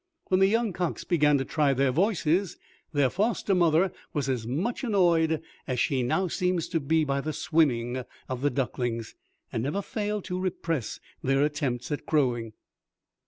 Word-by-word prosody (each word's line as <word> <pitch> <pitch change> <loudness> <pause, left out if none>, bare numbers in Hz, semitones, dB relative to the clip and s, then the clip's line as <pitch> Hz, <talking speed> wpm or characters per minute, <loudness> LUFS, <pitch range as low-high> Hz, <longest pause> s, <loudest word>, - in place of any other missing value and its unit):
When 185 - +3
the 195 - +6
young 225 0 +1
cocks 175 -1 -2
began 150 -4 +3
to 135 - -2
try 145 -2 +2
their 135 0 +2
voices, 180 - +1 0.3
their 145 -4 +2
foster 210 0 0
mother 175 0 +3 0.2
was 145 -3 -1
as 120 -4 -1
much 185 - -2
annoyed 170 - +2 0.2
as 130 -3 -1
she 135 0 +1
now 185 +10 +1
seems 180 -1 0
to 165 - 0
be 160 +2 +2
by 140 -1 0
the 155 +2 -3
swimming 130 -7 +1 0.2
of 130 -1 -4
the 145 - +3
ducklings, 120 -4 -2 0.4
and 115 - -1
never 150 - -2
failed 210 -1 -3
to 180 0 -3
repress 165 - -2 0.2
their 135 +1 +2
attempts 140 -4 -1
at 145 - -4
crowing. 120 -7 +1
155 Hz, 165 wpm, -27 LUFS, 130-180 Hz, 0.4 s, the